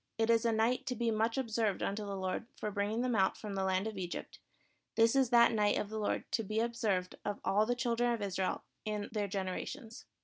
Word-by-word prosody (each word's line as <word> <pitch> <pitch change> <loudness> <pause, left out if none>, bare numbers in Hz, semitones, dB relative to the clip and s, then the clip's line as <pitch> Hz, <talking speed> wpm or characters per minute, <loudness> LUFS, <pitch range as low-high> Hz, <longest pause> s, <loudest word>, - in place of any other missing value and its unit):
It 225 +1 +3
is 230 0 +3
a 230 - +4
night 225 +3 +1
to 250 - -1
be 235 0 0
much 225 +3 +1
observed 225 -5 0
unto 205 +2 -1
the 200 -1 -4
Lord 190 +4 -3
for 210 - -2
bring 200 0 0
ing 225 +2 0
them 250 -2 +1
out 190 -2 +3
from 210 -2 -6
the 195 -1 -1
land 190 +1 +1
of 220 -3 -4
Egypt; 175 -2 -5 0.6
this 225 +2 +4
is 265 -3 +4
that 235 -1 +6
night 210 -2 +2
of 205 - -2
the 220 0 -4
Lord 210 - 0
to 225 - +1
be 215 +2 -1
observed 220 -6 0
of 205 -1 -3
all 210 +2 +3
the 245 - +1
children 240 -1 +1
of 235 - -1
Israel 190 -2 -1 0.2
in 210 -1 -3
their 210 -2 -1
generations. 200 +5 -5
215 Hz, 235 wpm, -33 LUFS, 200-230 Hz, 0.6 s, that